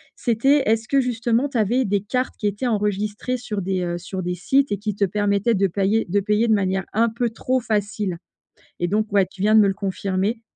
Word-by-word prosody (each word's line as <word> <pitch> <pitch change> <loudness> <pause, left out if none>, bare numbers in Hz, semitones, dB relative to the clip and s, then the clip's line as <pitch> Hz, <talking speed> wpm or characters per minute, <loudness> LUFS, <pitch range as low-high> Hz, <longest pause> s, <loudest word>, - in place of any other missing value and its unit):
c'était 270 +5 +2
est-ce 225 +1 +1
que 275 -1 +3
justement 240 +2 0
tu 260 - -3
avais 230 +4 +2
des 200 0 +1
cartes 250 +5 -2
qui 210 - -1
étaient 205 +5 -2
enregistrées 210 +2 -1
sur 220 -5 -4
des, 185 0 -1
heu, 175 -1 -2
sur 185 +1 -6
des 180 +1 -2
sites 265 +9 +1
et 205 - 0
qui 210 0 -4
te 205 - 0
permettaient 205 +3 +1
de 195 0 +2
pailler 200 +4 +1
de 200 +4 +1
payer 210 +3 +1
de 220 - +4
manière 190 -2 0
un 230 +2 +3
peu 235 +1 -1
trop 255 +3 -1
facile? 205 -5 -2 0.6
Et 175 - +1
donc, 215 +1 -1
ouais 200 -2 +4
tu 190 - -10
viens 215 +2 +4
de 220 - +8
me 205 - +4
le - - 0
confirmer. 195 +3 -2
210 Hz, 225 wpm, -22 LUFS, 195-235 Hz, 0.6 s, de